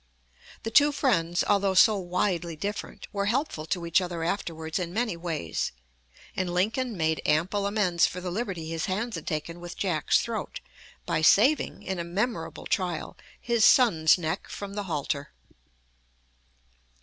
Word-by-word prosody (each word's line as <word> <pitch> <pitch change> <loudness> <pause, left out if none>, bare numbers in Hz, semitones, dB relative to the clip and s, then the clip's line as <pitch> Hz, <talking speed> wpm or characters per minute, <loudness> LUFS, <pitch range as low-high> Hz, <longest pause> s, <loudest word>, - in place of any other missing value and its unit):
The 225 - -3
two 290 +5 +6
friends, 175 - +1
although 200 -1 +2
so 215 +3 +7
widely 180 -2 -1
different, 200 +6 -5
were 200 0 -1
helpful 230 - -1
to 175 -1 -2
each 170 +2 +3
other 175 -2 -4
afterwards 165 -2 -2
in 175 0 -4
many 225 -5 0
ways, 165 - -3 0.6
and 185 -2 -1
Lincoln 220 +6 0
made 160 -1 0
ample 185 +7 +1
amends 190 -5 +2
for 180 - -6
the 180 0 -4
liberty 185 -5 -3
his 165 0 -3
hands 220 +5 -2
had - - -6
taken 165 +2 -3
with 175 0 -8
Jack's 170 -7 +2
throat, - - -4 0.5
by - - 0
saving, 240 - +4
in 190 -2 -3
a - - -1
memorable 175 0 -3
trial, 180 -4 -2 0.2
his 235 -2 +1
son's 170 - +6
neck 160 -2 -3
from 200 -1 -6
the 205 0 -4
halter. 145 -4 -3
180 Hz, 150 wpm, -27 LUFS, 165-205 Hz, 0.6 s, so